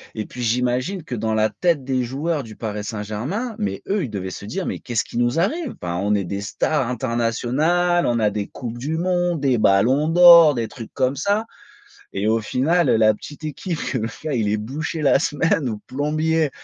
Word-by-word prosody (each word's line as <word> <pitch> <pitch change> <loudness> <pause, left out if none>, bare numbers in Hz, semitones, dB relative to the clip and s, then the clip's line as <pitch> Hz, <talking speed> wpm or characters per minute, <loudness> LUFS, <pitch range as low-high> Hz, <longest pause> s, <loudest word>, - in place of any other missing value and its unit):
Et 110 - -3
puis, 125 - -7
j'imagine 125 - 0
que 125 - -5
dans 110 0 -1
la 110 0 +2
tête 165 -7 0
des 130 -1 0
joueurs 145 +5 -2
du 110 -2 -11
Paris 105 -2 -4
Saint-Germain, 115 - -4
mais 95 -1 -3
eux, 200 -1 0
ils 125 - -4
devaient 95 -2 -4
se - - -8
dire: 180 - -4
«Mais - - -3
qu'est-ce 120 -3 -2
qui - - -8
nous 120 +5 +1
arrive? 265 - -1
Enfin 85 -1 -3
on 100 +3 0
est 100 -2 0
des 100 +3 -4
stars 130 +6 -1
internationales, 130 +9 +1
on 120 -1 +1
a 105 -1 +3
des 105 0 -3
coupes 120 -2 -7
du 150 +6 -3
monde, 175 -1 0
des 135 -3 +2
ballons 120 +10 +3
d'or, 170 -3 +8
des 115 -2 -2
trucs 115 0 -10
comme 130 0 0
ça, 200 +8 0 0.7
et 100 +2 -1
au 110 +1 +3
final 150 +9 +1
heu, 115 - +4
la 110 -1 +5
petite 145 +8 -11
équipe 155 +2 -4
que 130 - 0
le 110 0 -2
gars 155 -3 -2
il 110 -4 0
est 105 - +1
boucher 150 +9 -4
la 140 -1 +4
semaine 150 -2 0
ou 110 - -4
plombier» 155 +3 0
130 Hz, 215 wpm, -21 LUFS, 110-160 Hz, 0.7 s, d'or